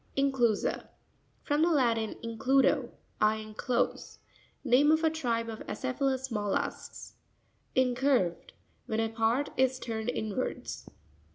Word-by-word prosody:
Incivu'sa.—From 270 +3 -1
the 335 - +4
Latin, 235 -8 +1
includo, 260 +2 +2 0.3
I 215 0 +4
enclose. 220 +3 -2 0.5
Name 280 +3 +5
of 315 +1 +3
a 320 - +3
tribe 235 -7 -1
of 225 -1 -6
acephalous 265 0 -2
mollusks. 205 -3 -3 0.6
Incurv'Ep.—When 245 - 0
a 225 0 +1
part 225 +5 +1
is 260 0 +3
turned 225 -2 -4
inwards. 220 +1 -4
245 Hz, 100 wpm, -30 LUFS, 225-270 Hz, 0.6 s, Name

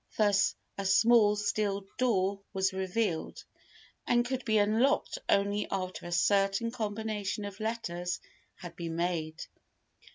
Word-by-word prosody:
Thus 205 -2 +3 0.2
a 195 - -2
small 210 +2 +5
steel 205 -1 -1
door 200 -5 +1
was 190 -1 +1
revealed, 190 -2 -2 0.6
and 240 0 +3
could 260 0 -3
be 220 -1 +3
unlocked 225 - +2
only 200 +1 +2
after 185 -2 -4
a - - -7
certain 195 +5 +2
combination 215 -2 -3
of 200 0 -8
letters 180 -6 -3 0.4
had 175 -1 -10
been 170 -2 -5
made. 165 -2 -2
200 Hz, 125 wpm, -30 LUFS, 185-220 Hz, 0.6 s, small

